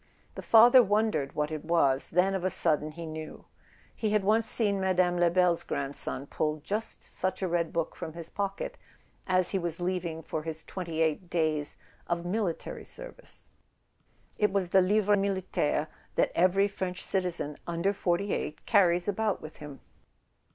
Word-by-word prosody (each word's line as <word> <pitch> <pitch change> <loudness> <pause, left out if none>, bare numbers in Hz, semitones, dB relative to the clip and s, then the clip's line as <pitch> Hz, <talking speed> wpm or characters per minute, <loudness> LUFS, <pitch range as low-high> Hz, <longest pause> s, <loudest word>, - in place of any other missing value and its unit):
The - - -7
father 240 +3 +7
wondered 205 - 0
what 150 +1 -1
it 155 -1 -5
was; 145 -5 +2
then 180 +3 +2
of 190 -2 -2
a 185 - +1
sudden 155 -3 +1
he 170 +1 -7
knew. 155 0 -8 0.5
He 220 - -1
had 210 -1 +1
once 220 +3 +3
seen 200 -4 +4
Mme. 180 -1 +2
Lebel's 175 0 +3
grandson 140 -1 0
pull 150 +1 -2
just 210 +8 -4
such 185 +1 -3
a - - +1
red 170 -1 0
book 165 -1 -2
from 160 - -7
his 170 -1 -6
pocket 200 +1 -4 0.5
as 185 -1 +2
he 195 - 0
was 170 -1 -3
leaving 175 -3 -3
for 155 - -4
his 160 0 -6
"twenty 170 -4 -4
eight 160 +3 -1
days" 155 -3 0 0.3
of 170 0 -2
military 185 -2 -3
service; - - -9 0.9
it 210 -2 +3
was 190 -3 0
the 190 +1 +5
livret 205 +2 +3
militaire 190 -6 -1 0.3
that - - +2
every 185 +3 +3
French 185 -2 -4
citizen 175 -6 0
under 170 +4 0
forty 195 +1 -1
eight 150 - -4
carries 180 -4 +3
about 210 0 0
with 155 - -10
him. 150 -2 -10
180 Hz, 165 wpm, -29 LUFS, 160-195 Hz, 0.9 s, father